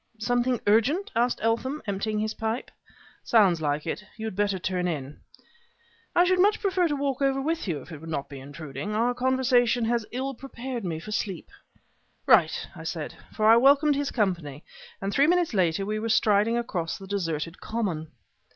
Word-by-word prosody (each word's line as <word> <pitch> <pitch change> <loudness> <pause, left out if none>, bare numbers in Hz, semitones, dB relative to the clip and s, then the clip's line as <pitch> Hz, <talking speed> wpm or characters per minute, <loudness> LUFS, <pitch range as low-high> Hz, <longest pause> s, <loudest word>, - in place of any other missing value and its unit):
"Something 245 +2 +1
urgent?" 270 - +2
asked 240 +2 +2
Eltham, 245 +6 0
emptying 210 +1 -2
his 215 +1 -1
pipe. 225 +2 -3 0.5
"Sounds 195 -8 +4
like 150 0 -1
it. 165 - -3
You 220 - -5
had 220 - -4
better 205 -1 +1
turn 180 +1 -1
in." 145 -4 -4 1.0
"I 350 - +6
should 365 0 +2
much 410 +3 +4
prefer 375 -3 +1
to 295 - -1
walk 275 -1 -2
over 270 -1 +2
with 320 -1 -2
you, 150 -7 -2
if - - -15
it 155 - -8
would 165 - -9
not 140 -3 -3
be 140 -2 -9
intruding. 145 +6 -6
Our 235 +3 +2
conversation 250 -2 +2
has 230 -1 0
ill 265 +2 -3
prepared 255 -2 -6
me 170 -4 -3
for 215 +6 -9
sleep." 195 -3 -3 0.7
"Right!" - - +4
I - - -9
said; - - -4 0.2
for 215 - -1
I 225 +1 +8
welcomed 285 +4 +5
his 285 0 -1
company; 170 - -2 0.4
and 195 +1 -3
three 280 +2 +4
minutes 350 -4 +2
later 185 -1 +1
we 215 +1 -2
were 225 +1 -3
striding 215 +1 +3
across 180 -8 -3
the 195 - -10
deserted 165 -4 -3
common. 190 -9 -2
220 Hz, 185 wpm, -26 LUFS, 180-260 Hz, 1.0 s, I